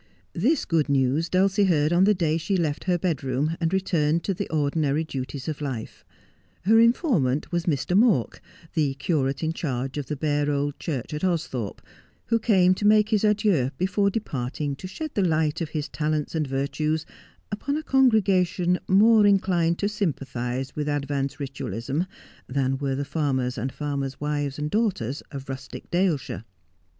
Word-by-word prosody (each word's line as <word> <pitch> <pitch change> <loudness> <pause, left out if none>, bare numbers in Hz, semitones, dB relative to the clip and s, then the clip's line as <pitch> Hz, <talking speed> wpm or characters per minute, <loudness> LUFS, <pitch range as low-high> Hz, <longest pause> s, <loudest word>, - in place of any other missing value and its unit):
This 260 - +1
good 160 -3 +1
news 140 +4 +2
Dulcie 195 +2 +3
heard 155 -3 +2
on 180 +2 +5
the 210 +1 +4
day 165 -2 +1
die 195 +4 -1
left 155 -5 -1
her 180 -1 +2
bed 165 -5 -1
room, 135 +5 0
and 165 -1 0
returned 170 -4 +1
to 195 - 0
the - - -4
ordinary 150 0 +1
duties 135 -2 -5
of 155 -2 -4
life. 130 -6 -5 0.6
Her 225 +4 +5
informant 225 - +2
was 175 0 -1
Mr. 160 +3 0
Mawk, 205 - +3 0.3
the 145 -4 +1
curate 140 -1 -1
in 160 +1 0
charge 135 -3 -3
of 140 - -5
the 150 - -2
bare 145 0 0
old 145 0 -1
church 145 -5 -4
at 150 - -4
Austhorpe, 150 - -2 0.4
who 230 -1 +1
came 190 -5 +4
to 205 +2 0
make 215 0 +5
his 215 -1 +2
adieux 205 - +2
before 200 +2 +1
departing 145 - -3
to 185 - -7
shed 310 +11 -6
the 205 - +1
light 160 -4 +1
of 160 - -2
his 155 -1 -3
talents 150 0 -2
and 155 -3 -1
virtues 150 +4 -1 0.5
upon 280 +8 -2
a 310 - -4
congregation 195 - +3
more 210 +2 +6
inclined 180 -4 +2
to 200 - 0
sympathize 135 - -3
with 150 0 -2
advanced 140 -1 -2
Ritualism 135 +3 -3 0.4
than 135 0 0
were 135 -2 -1
the 140 +1 -2
farmers 135 -3 -1
and 130 +3 -3
farmers' 140 -2 -3
wives 145 -2 -2
and 150 0 -3
daughters 185 - 0
of 140 -2 -8
rustic 135 0 -8
Dale 175 -2 +2
shire. 110 -6 -7
155 Hz, 170 wpm, -25 LUFS, 140-185 Hz, 0.6 s, more